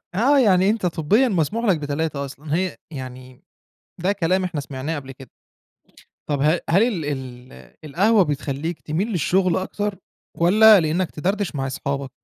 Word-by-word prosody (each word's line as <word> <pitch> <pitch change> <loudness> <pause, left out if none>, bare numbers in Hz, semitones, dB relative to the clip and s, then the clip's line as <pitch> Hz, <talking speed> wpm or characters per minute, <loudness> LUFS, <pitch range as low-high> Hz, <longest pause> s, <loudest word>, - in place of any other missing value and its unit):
آه، 270 +8 +3
يعني 195 -5 +4
أنت 215 -4 -1
طبيًا 180 - +2
مسموح 205 +5 -1
لك 190 -7 +2
ب3 145 0 -3
أصلًا، 145 +3 -6
هي 185 +1 -1 0.2
يعني 130 -1 -9 0.6
ده 195 - +2
كلام 185 -1 0
إحنا 170 -5 -3
سمعناه 140 +3 -5
قبل 135 -2 -7
كده. 135 -2 -13 1.0
طب 145 -2 -1
ه 155 +4 +3
هل 190 +6 +4
ال 200 -10 0
ال 130 -3 -6 0.3
القهوة 200 +8 +3
بتخلّيك 150 +1 -3
تميل 165 +8 -2
للشغل 185 0 +1
أكتر، 200 +1 -3 0.4
والّا 210 +4 +7
لإنَّك 165 +3 -1
تدردش 195 +2 -2
مع 135 -1 -2
اصحابك؟ 140 0 -4
165 Hz, 150 wpm, -22 LUFS, 140-195 Hz, 1.0 s, والّا